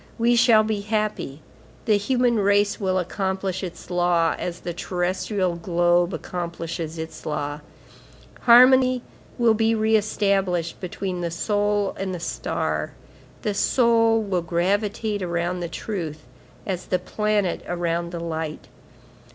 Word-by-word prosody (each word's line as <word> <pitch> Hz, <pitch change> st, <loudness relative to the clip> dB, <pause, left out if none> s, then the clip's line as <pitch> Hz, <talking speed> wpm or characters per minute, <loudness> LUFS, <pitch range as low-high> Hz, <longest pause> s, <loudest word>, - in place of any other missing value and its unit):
We 235 Hz, +1 st, +3 dB
shall 230 Hz, -2 st, +6 dB
be 215 Hz, -1 st, -1 dB
happy. 210 Hz, -9 st, -2 dB, 0.4 s
The 215 Hz, -, +4 dB
human 240 Hz, +3 st, +2 dB
race 205 Hz, 0 st, +2 dB
will 190 Hz, -2 st, 0 dB
accomplish 190 Hz, +1 st, -2 dB
its 180 Hz, 0 st, -8 dB
law, 175 Hz, -2 st, +2 dB
as 175 Hz, -1 st, -4 dB
the 175 Hz, -, -4 dB
terrestrial 180 Hz, +1 st, -1 dB
globe 175 Hz, +1 st, +2 dB
accomplishes 170 Hz, -2 st, -5 dB
its 160 Hz, 0 st, -7 dB
law; 145 Hz, -1 st, -3 dB, 0.8 s
harmony 255 Hz, +1 st, +6 dB, 0.3 s
will 235 Hz, -2 st, +4 dB
be 225 Hz, +1 st, +2 dB
re 220 Hz, 0 st, +2 dB
established 195 Hz, -5 st, 0 dB
between 180 Hz, 0 st, -4 dB
the 170 Hz, -, -1 dB
soul 205 Hz, +3 st, 0 dB
and 190 Hz, -1 st, -2 dB
the -, -, -6 dB
star; 170 Hz, -, -2 dB, 0.5 s
the 210 Hz, -, 0 dB
soul 230 Hz, 0 st, +3 dB
will 190 Hz, -4 st, -1 dB
gravitate 205 Hz, +5 st, -1 dB
around 175 Hz, 0 st, -1 dB
the 170 Hz, -1 st, -4 dB
truth, 160 Hz, -3 st, -5 dB, 0.4 s
as 185 Hz, -2 st, -4 dB
the 185 Hz, -, +1 dB
planet 210 Hz, -2 st, -1 dB
around 170 Hz, -1 st, -2 dB
the 170 Hz, -, -5 dB
light. 160 Hz, -4 st, -5 dB
190 Hz, 130 wpm, -23 LUFS, 170-215 Hz, 0.8 s, shall